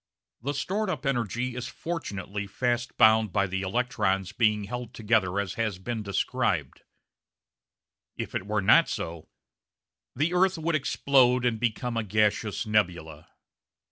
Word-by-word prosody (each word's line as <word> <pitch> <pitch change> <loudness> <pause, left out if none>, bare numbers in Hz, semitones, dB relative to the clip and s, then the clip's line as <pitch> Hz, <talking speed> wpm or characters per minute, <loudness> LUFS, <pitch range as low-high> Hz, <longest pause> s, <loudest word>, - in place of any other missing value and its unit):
The 140 +4 -3
stored 205 +7 -1
up 145 -6 -3
energy 120 -1 -1
is 125 - -4
fortunately 105 - -5
fast 120 +3 -2
bound 110 -1 +5
by 100 0 +2
the 95 0 -3
electrons 95 -3 0
being 105 -2 +2
held 120 +3 -6
together 105 -4 +1
as 100 -2 -2
has 110 -5 -1
been 110 +4 -4
described. 100 -2 -1 1.4
If - - -5
it 95 - -3
were 105 -1 0
not 165 +12 +6
so 85 -1 -5 0.9
"the 155 +7 0
earth 185 0 +3
would 165 +1 -1
explode 130 -3 +3
and 115 -3 +1
become 120 +1 -1
a 115 - 0
gaseous 105 +1 0
nebula"! 85 -7 -1
110 Hz, 140 wpm, -27 LUFS, 100-125 Hz, 1.4 s, not